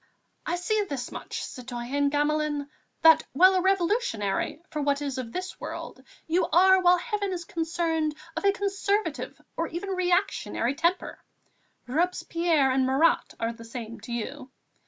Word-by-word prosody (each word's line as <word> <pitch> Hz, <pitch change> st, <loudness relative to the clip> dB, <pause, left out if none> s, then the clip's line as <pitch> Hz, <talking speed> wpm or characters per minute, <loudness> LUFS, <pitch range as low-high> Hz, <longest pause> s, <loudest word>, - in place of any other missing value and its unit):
"I -, -, +1 dB
see 420 Hz, +4 st, 0 dB
this 255 Hz, -4 st, -4 dB
much, -, -, -5 dB
citoyen 255 Hz, +3 st, -2 dB
Gamelin, 295 Hz, 0 st, 0 dB, 0.3 s
that, 325 Hz, 0 st, +8 dB
while 370 Hz, +7 st, +6 dB
a 370 Hz, -, +2 dB
Revolutionary 370 Hz, -, 0 dB
for 305 Hz, -, -2 dB
what 280 Hz, 0 st, +1 dB
is 275 Hz, -3 st, -3 dB
of 235 Hz, -3 st, -5 dB
this 370 Hz, +4 st, -5 dB
world, -, -, -7 dB, 0.2 s
you 340 Hz, +3 st, +1 dB
are, 380 Hz, +2 st, +5 dB
where 360 Hz, 0 st, +6 dB
Heaven 405 Hz, +1 st, -2 dB
is 345 Hz, -2 st, -4 dB
concerned, 325 Hz, -2 st, -1 dB, 0.2 s
of -, -, -3 dB
a 400 Hz, -, +5 dB
conservative, 400 Hz, +1 st, -1 dB, 0.2 s
or 330 Hz, -, -1 dB
even 345 Hz, +5 st, -5 dB
a -, -, -1 dB
reactionary 360 Hz, -, 0 dB
temper. 340 Hz, +5 st, -1 dB, 0.6 s
Robespierre 330 Hz, 0 st, +1 dB
and 260 Hz, 0 st, +2 dB
Marat 275 Hz, +6 st, +2 dB
are 230 Hz, +1 st, -1 dB
the 230 Hz, 0 st, -12 dB
same 230 Hz, 0 st, -7 dB
to 225 Hz, +3 st, -10 dB
you. 260 Hz, +3 st, -5 dB
320 Hz, 155 wpm, -27 LUFS, 265-365 Hz, 0.6 s, that